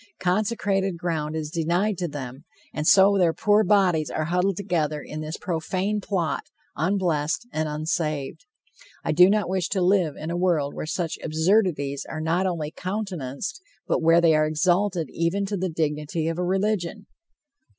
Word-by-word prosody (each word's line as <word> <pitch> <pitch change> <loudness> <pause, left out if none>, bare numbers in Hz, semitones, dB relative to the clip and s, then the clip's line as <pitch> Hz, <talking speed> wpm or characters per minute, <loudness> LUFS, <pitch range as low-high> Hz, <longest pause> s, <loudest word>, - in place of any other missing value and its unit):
Consecrated 195 -1 0
ground 160 -3 -2
is 155 -1 -4
denied 175 +5 0
to 175 - -1
them, 135 -2 -7 0.3
and 150 0 -2
so 195 +1 +6
their 170 -3 +3
poor 210 +4 +3
bodies 180 -6 +3
are 155 - -2
huddled 180 +3 0
together 160 -6 -1
in 155 +1 -7
this 155 +2 -5
profane 185 +4 -2
plot, 180 -6 -1 0.3
unblessed 170 0 0
and 155 0 -1
unsaved. 155 - -3 0.6
I - - +1
do 180 +4 +7
not 210 -2 +2
wish 185 -1 -1
to 195 -2 0
live 180 -5 +2
in 160 +2 -5
a - - -2
world 170 -6 +1
where - - -5
such 165 0 -3
absurdities 160 -4 +1
are 155 - -5
not 170 +4 +1
only 160 -4 -3
countenanced, 185 - -4 0.2
but - - 0
where 165 +1 +5
they 165 -2 +5
are 155 0 +3
exalted 175 +2 +1
even 170 +4 0
to 200 +1 -3
the 185 -1 -2
dignity 155 0 -2
of 165 +1 -2
a - - 0
religion! 195 +1 -1
170 Hz, 165 wpm, -25 LUFS, 155-190 Hz, 0.6 s, do